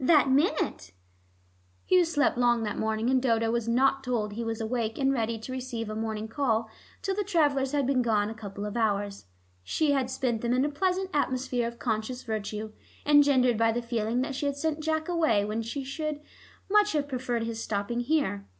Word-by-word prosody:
"That 285 -1 +5
minute." 280 - +1 0.9
Hugh 365 -1 +5
slept 305 -3 +1
long 240 -1 +2
that 210 -1 -3
morning, 220 +2 0
and 260 -1 +3
Dodo 230 -3 +2
was 235 -1 -1
not 270 +3 +2
told 225 -5 -1
he 230 +2 -4
was 225 -1 -3
awake 225 -1 -2
and 270 0 +2
ready 230 -2 -1
to 225 +4 -8
receive 250 -4 -4
a - - -4
morning 220 0 -3
call 225 -3 0 0.3
till 390 - 0
the 410 +2 -1
travelers 290 -8 +2
had 285 -2 +1
been 260 -1 +2
gone 215 -4 +2
a 220 - -4
couple 205 -2 -7
of 210 - -5
hours. 205 - -1 0.4
She 300 - +1
had 265 -3 +1
spent 250 -3 -1
them 240 0 0
in 255 +2 +2
a - - 0
pleasant 370 +5 -1
atmosphere 255 -4 0
of 235 0 -7
conscious 235 +3 -2
virtue, 215 -1 -4 0.3
engendered 280 -5 +5
by 225 0 +4
the 240 +1 -2
feeling 235 0 -1
that 275 +2 -2
she 280 +2 -2
had 280 0 -2
sent 315 +1 -1
Jack 315 0 -1
away 315 -13 +2
when 215 +2 -2
she 230 +5 -4 0.2
would 305 -1 -2 0.5
much 415 +1 +4
have 290 -2 0
preferred 250 -3 -2
his 230 0 -4
stopping 205 +3 -2
here. 245 - 0
245 Hz, 200 wpm, -28 LUFS, 225-285 Hz, 0.9 s, That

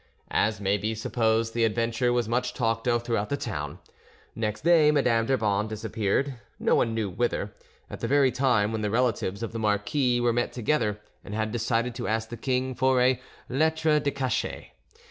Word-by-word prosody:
As 105 0 +1
may 100 0 +1
be 110 +2 -2
supposed, 115 0 0
the 115 - +1
adventure 115 +2 +1
was 120 -2 +1
much 125 +1 -1
talked 115 -1 -1
of 120 -1 +2
throughout 115 -3 -1
the 140 - -1
town. 75 - -4 0.6
Next 105 -2 -3
day, 165 -2 +5
Madame 125 -6 +2
d'Urban 105 -5 +1
disappeared, 110 +4 -2 0.2
no - - +1
one 115 -1 +2
knew 110 -2 -1
whither, 100 0 -2 0.3
at - - -8
the - - -2
very 140 -2 +4
time 125 -5 +2
when 110 -1 -2
the 105 - 0
relatives 115 -3 0
of 115 - -4
the 115 - -5
marquis 115 +5 +1
were 120 -1 +2
met 120 +1 -1
together 115 -4 0 0.2
and 105 - -7
had 110 0 -1
decided 115 +1 0
to 120 0 -4
ask 110 0 -1
the 120 - -5
king 130 +2 -1
for 130 0 +2
a 125 0 +3 0.3
'lettre 155 +2 +2
de 145 - 0
cachet'. 130 -4 -3
115 Hz, 185 wpm, -27 LUFS, 110-130 Hz, 0.6 s, day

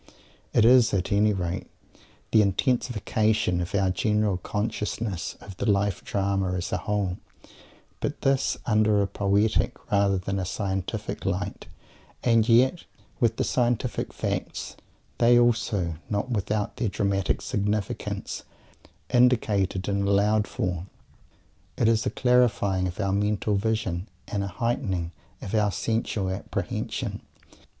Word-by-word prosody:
It 110 - +4
is, 120 -2 +6
at 95 -1 -1
any 105 +1 +4
rate, 90 -2 -3 0.7
an 110 - +7
intensification 110 -2 +1
of 85 +3 -3
our 95 -2 +2
general 105 -1 +1
consciousness 105 -1 -3
of 100 -2 -11
the 110 - 0
Life 100 -2 +1
Drama 95 -2 0
as 90 0 -3
a - - +1
whole, 100 -3 -2 0.8
but - - -3
this, 135 0 +2
under 105 -2 +3
a - - -1
poetic, 100 +2 +1 0.2
rather 100 -1 +3
than 95 +2 -2
a - - -1
scientific, 100 +2 -3
light, 100 +1 -3 0.6
and 115 -1 +3
yet 130 +9 +4 0.4
with 115 -2 +2
the - - +1
scientific 120 -2 0
facts, - - -4 0.4
they 120 +1 +6
also 110 -8 +1
not 105 +5 -1
without 105 0 -1
their 115 - 0
dramatic 100 -1 0
significance 105 -1 -2 0.7
indicated 110 -7 +2
and 100 -1 0
allowed 105 +1 +3
for. 90 -6 -3 0.9
It 115 - +3
is 115 -1 +2
a - - +3
clarifying 105 -7 +2
of 90 +2 -7
our 100 -2 0
mental 105 +1 0
vision 105 -3 -1 0.2
and 100 -3 -2
a - - -2
heightening 95 -5 -2 0.3
of 95 - -6
our 105 -2 +3
sensual 100 -1 -1
apprehension. 95 +2 -3
105 Hz, 130 wpm, -26 LUFS, 95-110 Hz, 0.9 s, an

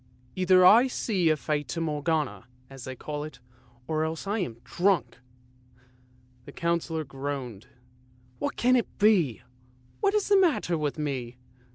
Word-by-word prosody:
" 125 0 -31
Either 185 0 +6
I 230 +7 +7
see 195 -9 0
a 155 - +2
Fata 145 +1 -3
Morgana, 150 -4 -1 0.2
as 135 -2 -9
they 130 - -6
call 150 +3 -5
it, 155 -3 -9 0.5
or 155 0 0
else 160 +3 -4
I 205 +3 -1
am 140 - -3
drunk! 175 0 0 0.6
" 125 0 -32
the - - -10
Councillor 170 -1 -1
groaned. 135 -5 -6 0.4
" 125 0 -32
What - - -2
can 250 +1 +3
it 240 - +1
be? 180 - +3 0.6
What 400 0 +1
is 420 - +1
the 405 - +5
matter 310 - +1
with 150 -2 -2
me? 130 -5 -4
150 Hz, 160 wpm, -27 LUFS, 125-180 Hz, 0.6 s, I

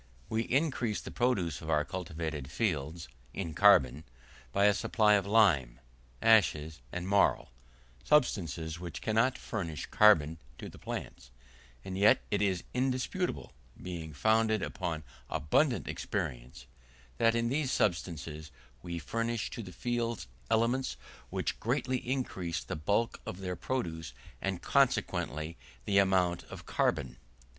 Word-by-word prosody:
We 110 0 +1
increase 125 -4 0
the - - -8
produce 110 - 0
of 80 - -7
our 75 -1 +2
cultivated 80 -6 -4
fields, 80 - -2 0.3
in 85 -5 -3
carbon, 75 -7 +5 0.5
by 100 +10 +3
a 105 - +6
supply 105 0 +3
of 100 -1 +2
lime, 85 - +3 0.4
ashes, 80 - +4
and 90 +1 -4
marl, 100 -9 +3 0.5
substances 85 - +1
which 85 -2 -6
cannot 115 +4 +2
furnish 85 - -4
carbon 80 -7 +5 0.2
to - - -7
the - - -14
plants, - - -6 0.6
and 95 -1 -5
yet 100 +3 +5
it 100 - +1
is 95 -4 +1
indisputable, 130 +8 -1 0.3
being 85 -3 -6
founded 110 +6 +2
upon 85 -5 -3 0.3
abundant 75 - +1
experience, - - -4 0.5
that 115 0 +4
in 115 0 +1
these 140 0 0
substances 80 -4 -1 0.3
we 85 -1 -5
furnish 115 +5 -2
to - - -5
the 95 -4 -9
fields 120 +1 -2 0.2
elements 115 +4 +1 0.3
which - - -2
greatly 130 +2 0
increase 95 -11 -3
the - - -4
bulk 100 +9 0
of 90 - -6
their 90 -1 -3
produce, 80 - -3 0.3
and - - -2
consequently 75 +5 +1 0.3
the 100 -1 +4
amount 95 -3 +2
of - - -10
carbon. - - 0
95 Hz, 130 wpm, -31 LUFS, 80-115 Hz, 0.6 s, a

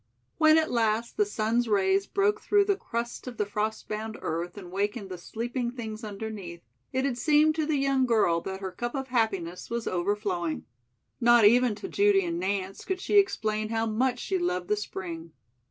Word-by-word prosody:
When 315 0 +6
at 320 -1 +1
last 230 0 0
the 420 -1 +2
sun's 230 - 0
rays 195 -1 +2
broke 415 +2 +1
through 410 -1 +3
the 400 -1 +2
crust 235 -8 -5
of 245 -3 -7
the 210 - +1
frost 215 +2 -3
bound 220 +1 -4
earth 170 +4 -3
and 180 -3 -9
wakened 205 +2 -2
the 180 - -5
sleeping 235 +6 -3
things 225 -2 -7
underneath, 200 -5 -6 0.3
it 260 +1 0
had 250 -3 -1
seemed 305 +2 +4
to 310 -2 0
the 310 -2 +1
young 270 -1 +2
girl 190 -8 +3
that 190 +2 -6
her 190 -1 -4
cup 240 +6 -4
of 265 -1 -4
happiness 195 -8 -1
was 235 -1 -3
overflowing. 180 -2 -1 0.5
Not 240 -2 +6
even 240 +1 +5
to - - -7
Judy 200 -2 +3
and 170 0 -2
Nance 190 +1 -2
could 380 -1 -2
she 410 +2 +4
explain 215 - 0
how 225 0 0
much 245 +3 +1
she 190 -6 -2
loved 180 0 -1
the 210 - +3
spring. 170 -5 -6
220 Hz, 190 wpm, -28 LUFS, 195-250 Hz, 0.5 s, When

